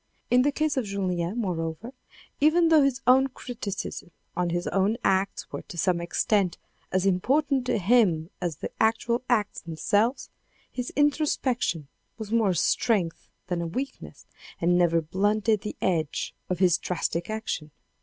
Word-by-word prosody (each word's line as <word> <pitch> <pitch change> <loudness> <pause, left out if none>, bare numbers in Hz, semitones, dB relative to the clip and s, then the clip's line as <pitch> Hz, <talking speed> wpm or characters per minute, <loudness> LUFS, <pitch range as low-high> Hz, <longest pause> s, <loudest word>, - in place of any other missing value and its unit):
In 250 +1 +6
the 290 +3 +2
case 310 0 -1
of 255 - +1
julien, 185 -1 -2
moreover, 180 +2 -3 0.5
even 325 +3 +4
though 315 -2 +6
his 275 -2 +1
own 260 +2 +6
criticisms 210 -7 -6 0.2
on 180 -1 0
his 175 +1 -1
own 200 +4 +1
acts 195 +1 0
were - - -5
to 180 - -9
some 170 +1 +1
extent 185 +1 +1 0.3
as 185 0 +1
important 260 +8 +1
to - - +1
him 185 -6 +3
as 175 -3 -2
the - - -6
actual 230 +2 +2
acts 215 -4 +1
themselves, 205 - 0 0.4
his 250 -1 -4
introspection 270 - +1 0.3
was 220 -2 -7
more 225 -3 +3
a 180 - +1
strength 180 0 0 0.2
than 175 -1 -2
a 170 - -2
weakness 260 +11 -6 0.3
and 175 +1 +3
never 170 -2 +3
blunted 205 +5 +1
the 210 - -5
edge 160 -5 -1 0.2
of 180 - 0
his 180 -2 +3
drastic 170 0 -2
action. 215 -8 -3
200 Hz, 155 wpm, -26 LUFS, 175-245 Hz, 0.5 s, In